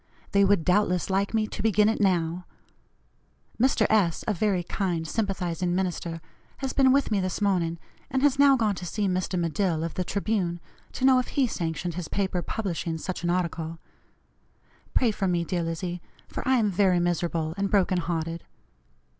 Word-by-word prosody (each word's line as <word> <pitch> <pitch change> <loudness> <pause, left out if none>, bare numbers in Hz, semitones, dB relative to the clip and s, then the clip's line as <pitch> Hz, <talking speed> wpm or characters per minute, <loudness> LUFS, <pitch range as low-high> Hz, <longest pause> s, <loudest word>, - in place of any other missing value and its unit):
They 200 0 +4
would 195 -5 +3
doubtless 180 -1 +2
like 195 +1 +1
me 220 -1 +1
to - - -6
begin 210 -1 +3
it 220 0 0
now. 175 -2 +1 1.1
Mr. 250 -4 +3
S., 195 -7 +2
a 215 - +2
very 195 -1 0
kind, 175 -3 -2
sympathizing 180 -3 -1
minister, 175 -3 -2 0.4
has 270 -1 -3
been 265 -2 +4
with 275 -3 +2
me 205 - +2
this 185 -1 -2
morning, 180 -5 +1 0.3
and 265 0 0
has 285 -1 +3
now 280 -1 +7
gone 220 -4 +1
to 180 - -6
see 205 +3 -1
Mr. 185 0 -1
Medill, 170 0 0
of 165 - -3
the 185 - -2
Tribune, 195 -3 -1 0.3
to 260 - -1
know 260 -1 +6
if 250 - -2
he 275 - +1
sanctioned 170 -5 -3
his 175 -1 -5
paper 190 -3 -1
publishing 170 -5 -3
such 180 +2 -5
an 175 - 0
article. 170 -2 -2 1.2
Pray 240 -3 +4
for 200 -2 -2
me, 175 -2 +1
dear 175 +1 -2
Lizzie, 170 +1 -3 0.3
for - - -5
I 260 - +4
am 215 -4 +2
very 185 -1 +3
miserable 170 -2 -1
and 200 0 -1
broken 190 -2 +2
hearted. 165 -1 -3
185 Hz, 180 wpm, -26 LUFS, 170-210 Hz, 1.2 s, now